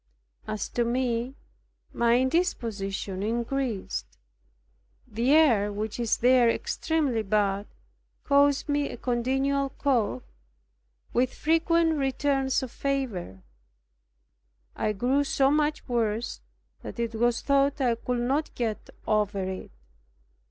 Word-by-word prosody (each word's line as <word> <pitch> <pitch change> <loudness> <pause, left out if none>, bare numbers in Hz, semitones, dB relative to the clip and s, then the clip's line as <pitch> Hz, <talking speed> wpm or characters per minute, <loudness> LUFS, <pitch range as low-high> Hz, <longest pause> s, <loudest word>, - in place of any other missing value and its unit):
As 215 -1 -3
to 240 - 0
me, 240 +1 -1 0.6
my 235 0 +3
indisposition 225 - -1
increased. 235 0 -3 0.9
The 235 +3 0
air, 235 -10 +4
which 215 +2 -4
is 235 -2 +1
there 245 -1 +5
extremely 285 -2 0
bad, 200 -1 0 0.6
caused 285 0 +3
me 290 -1 0
a - - -7
continual 270 +3 0
cough, 240 - 0 0.9
with 255 +1 +2
frequent 325 0 +2
returns 270 0 0
of 255 - -6
fever. 235 - -3 1.3
I 215 - 0
grew 255 +7 +1
so 275 -1 +2
much 300 0 0
worse 230 -1 -1 0.4
that - - -8
it 230 -1 -1
was 240 +1 +1
thought 280 +1 +2
I 250 -3 +2
could 240 +1 -2
not 275 +6 -1
get 225 -3 -3 0.2
over 205 -2 +1
it. 185 0 -5
245 Hz, 110 wpm, -27 LUFS, 220-275 Hz, 1.3 s, there